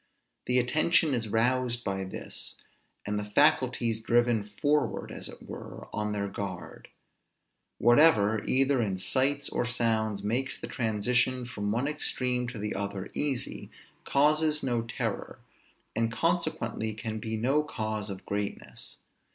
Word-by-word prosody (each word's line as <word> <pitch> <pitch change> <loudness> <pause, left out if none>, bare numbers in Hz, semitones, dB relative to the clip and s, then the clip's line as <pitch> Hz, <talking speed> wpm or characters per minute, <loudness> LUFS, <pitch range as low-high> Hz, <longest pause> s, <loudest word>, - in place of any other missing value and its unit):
The 125 - +3
attention 155 +4 +3
is 115 -3 -1
roused 120 +2 +1
by 95 -1 -2
this; 95 - -7 0.5
and 105 0 -1
the 105 - -4
faculties 125 -6 +3
driven 120 -1 +3
forward, 145 +9 0
as - - -4
it - - -12
were, - - -8
on 105 0 -1
their 100 -1 -1
guard. 95 -2 -6 0.9
Whatever, 115 -4 +5
either 135 0 +3
in 100 -4 -1
sights 135 +8 +1
or - - 0
sounds, 110 -4 0
makes 125 +6 -1
the - - -5
transition 125 +3 +1
from 105 -4 -3
one 120 +6 0
extreme 125 -4 0
to 120 0 -6
the 105 0 -2
other 100 -1 -4
easy, 140 -4 -2 0.3
causes 150 +2 +3
no 120 -3 +1
terror, 115 0 -3 0.6
and 115 0 +1
consequently 120 -9 0
can 110 -1 -4
be 110 +1 -3
no 135 +7 +3
cause 110 -7 -3
of 95 -1 -7
greatness. 100 0 -4
120 Hz, 135 wpm, -29 LUFS, 105-130 Hz, 0.9 s, Whatever